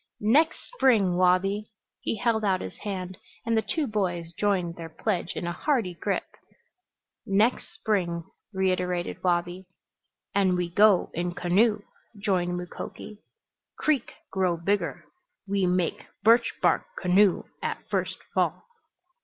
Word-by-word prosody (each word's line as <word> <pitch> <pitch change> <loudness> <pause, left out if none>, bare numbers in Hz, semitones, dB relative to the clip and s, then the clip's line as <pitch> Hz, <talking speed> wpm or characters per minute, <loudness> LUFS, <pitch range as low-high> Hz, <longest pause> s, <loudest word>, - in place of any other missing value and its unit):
"Next 280 +10 +3 0.2
spring, 220 - +3
Wabi!" 185 +3 +2 0.3
He - - -2
held 230 -2 +1
out 190 -2 +2
his 95 - -7
hand 185 -2 -5 0.3
and 230 0 +1
the 220 - +3
two 310 +6 -1
boys 175 -7 -2
joined 185 -2 0
their 165 -1 -7
pledge 175 +2 -2
in - - -3
a 175 - -1
hearty 225 - 0
grip. 170 - -1 1.0
"Next 210 +5 +1
spring!" 175 -6 -1 0.3
reiterated 180 -2 -1
Wabi. 175 +1 0 0.7
"And 190 -2 +3
we 175 -1 -2
go 205 0 +5
in 175 +1 -2
canoe," 205 +4 +2 0.3
joined 180 -3 0
Mukoki. 180 +3 -8 0.6
"Creek 295 -6 0 0.2
grow 185 -3 +1
bigger. 200 +5 -1 0.4
We 195 -1 +1
make 180 -1 0 0.2
birch 230 +2 +5
bark - - +4 0.2
canoe 185 +1 +4 0.2
at - - -4
first - - -1 0.2
fall." - - 0
190 Hz, 130 wpm, -27 LUFS, 175-210 Hz, 1.0 s, go